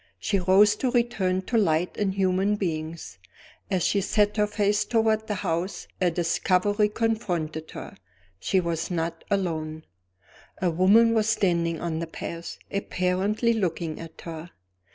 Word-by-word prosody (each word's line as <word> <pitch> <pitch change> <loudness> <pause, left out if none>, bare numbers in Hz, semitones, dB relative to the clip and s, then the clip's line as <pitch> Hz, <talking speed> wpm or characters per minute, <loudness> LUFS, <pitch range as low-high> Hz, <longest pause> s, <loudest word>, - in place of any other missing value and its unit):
She 200 -3 0
rose 195 +3 +5
to 255 - 0
return 215 -7 +1
to 230 +3 +1
light 170 -3 +1
and 195 -2 -1
human 190 +1 +2
beings. 160 - -4 0.5
As 185 -4 0
she 200 - +2
set 210 +1 +1
her 210 0 +3
face 210 0 +1
toward 220 -1 +1
the 210 - -1
house, 180 0 -3
a 180 - +4
discovery 185 +5 +1
confronted 180 -9 -2
her. - - -8 0.4
She 190 - +1
was 170 -2 -2
not 165 -1 -3
alone. 160 -6 -2 0.7
A 180 -2 +1
woman 205 +7 +5
was 220 -1 +2
standing 170 -6 +1
on 165 -2 -2
the 170 - -3
path, 170 +1 -6
apparently 200 +4 0
looking 170 -6 -2
at 165 -1 -10
her. 165 0 -7
185 Hz, 145 wpm, -26 LUFS, 165-210 Hz, 0.7 s, rose